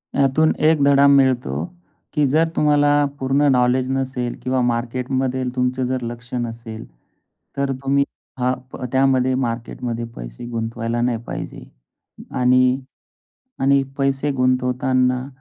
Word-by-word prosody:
यातून 140 +3 +3 0.2
एक 155 -3 +3
धडा 140 0 +5
मिळतो, 130 -3 +3 0.5
की 150 -2 +2
जर 160 +4 +3
तुम्हाला 145 -1 +3
पूर्ण 135 +2 +1
नॉलेज 125 0 +2
नसेल 130 -2 -2
किंवा 130 0 0
मार्केटमध्ये 125 +2 -1
तुमचं 125 0 0
जर 130 0 -2
लक्ष 120 +1 -7
नसेल, 115 -2 -5 0.7
तर 140 0 0
तुम्ही 140 +1 +3 0.4
हां, 125 +1 +2 0.2
प - - -8
त्यामध्ये 130 -1 +3
मार्केटमध्ये 120 -1 -3
पैसे - - -8
गुंतवायला 115 +1 -2
नाही 120 -1 +1
पाहिजे. - - -6 0.7
आणि 125 +1 +3 0.8
आणि 135 +1 +4 0.2
पैसे 135 +1 0
गुंतवताना 125 0 +1
130 Hz, 115 wpm, -21 LUFS, 125-135 Hz, 0.8 s, धडा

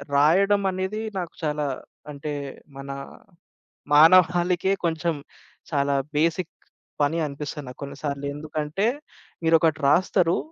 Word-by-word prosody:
రాయడం 195 +8 +4
అనేది 190 +4 -3 0.2
నాకు 175 -2 -5
చాలా 150 -1 -1 0.5
అంటే 145 +1 -5 0.4
మన 135 0 -8 1.0
మానవాళికే 180 +3 +5
కొంచెం 165 0 0 0.6
చాలా 140 -1 +1 0.2
బేసిక్ 165 +2 +1 0.5
పని 150 +3 +2
అనిపిస్తది 145 0 -6
నాకు 125 - -10
కొన్ని 140 - -7
సార్లు. 140 -1 -3
ఎందుకంటే? 155 +6 -2 0.6
మీరొకటి 160 -1 +3
రాస్తరు. 175 +1 +3
160 Hz, 105 wpm, -24 LUFS, 145-180 Hz, 1.0 s, మానవాళికే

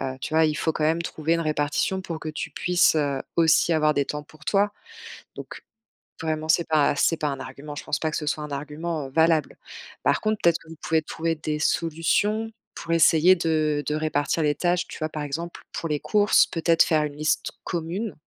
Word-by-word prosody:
heu, 130 0 -4
tu 155 - -5
vois? 160 - +5
Il 155 -1 +1
faut 160 - 0
quand 155 - -3
même 160 +2 +2
trouver 160 0 -1
une 165 - 0
répartition 155 +4 0
pour 170 -4 -6
que 155 - -6
tu 155 - -5
puisses, 180 -2 +2
heu, 140 -3 0
aussi 165 0 +4
avoir 155 -1 +3
des 140 - +1
temps 150 +1 -5
pour 155 +1 -18
toi. 205 +3 +2 0.6
Donc, - - -9 0.6
vraiment, 155 -1 -2
c'est 170 +1 +2
pas 150 -2 +3
c'est 165 +3 +2
pas 150 -2 -1
un 135 -1 -4
argument. 140 +3 -8
Je - - -6
pense - - -2
pas 160 -1 -2
que - - -2
ce 150 - -3
soit 150 0 -1
un 150 - -7
argument, 150 +1 -4
heu, - - -13
valable. 160 +1 +2 0.5
Par - - +2
contre, 215 0 0
peut-être 170 -1 +3
que 165 - -19
vous 165 - -10
pouvez 160 -1 +1
trouver 165 +1 -2
des 155 -1 -3
solutions 175 +8 0 0.2
pour 165 - -5
essayer 165 +2 +6
de 155 -3 0
de 150 - -2
répartir 155 +1 0
les 150 -1 +2
tâches, 175 +1 0
tu - - -9
vois? 155 - -2
Par 150 -1 -5
exemple, 165 +4 -5
pour 165 - -4
les 150 -1 0
courses, 205 +6 +3
peut-être 165 0 +3
faire 155 -2 +2
une 145 -1 -4
liste 155 +1 0
commune? 175 +5 -3
160 Hz, 220 wpm, -24 LUFS, 150-165 Hz, 0.6 s, essayer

